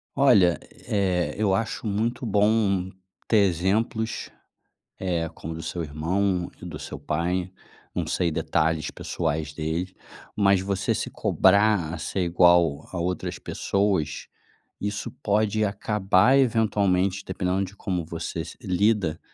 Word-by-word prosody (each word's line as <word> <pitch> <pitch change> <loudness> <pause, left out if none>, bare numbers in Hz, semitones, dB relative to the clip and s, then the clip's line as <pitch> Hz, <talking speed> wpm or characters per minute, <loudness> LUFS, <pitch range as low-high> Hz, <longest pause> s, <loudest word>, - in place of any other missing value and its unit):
Olha, 90 -4 +5 0.3
eh, 95 -4 0
eu 105 -3 +2
acho 110 +2 -2
muito 115 +5 -1
bom 100 -3 +2 0.4
ter 110 - +3
exemplos, 110 +6 -1 0.7
eh, 85 -3 -1
como 80 - -7
do 80 - -6
seu 85 - -4
irmão 90 +5 -1
e - - -6
do 80 -4 -7
seu - - -7
pai. 85 +5 -1 0.4
Não - - -1
sei 85 -2 0
detalhes 80 0 0
pessoais 80 -2 -3
deles, 80 +4 -3 0.4
mas 100 -2 +4
você 100 0 -1
se - - -3
cobrar 100 -4 +3
a 80 - -4
ser 95 +4 -3
igual 85 -3 +3
a 95 - -3
outras 90 0 -2
pessoas, 100 -7 -1 0.5
isso 105 +1 -3
pode 105 +1 +1
acabar 105 +4 +3
eventualmente, 100 -6 +2
dependendo 95 +1 -1
de 95 +2 -9
como 90 -5 -2
você 85 0 -5
se, - - -10
lida, 95 -3 +1
95 Hz, 130 wpm, -25 LUFS, 85-105 Hz, 0.7 s, Olha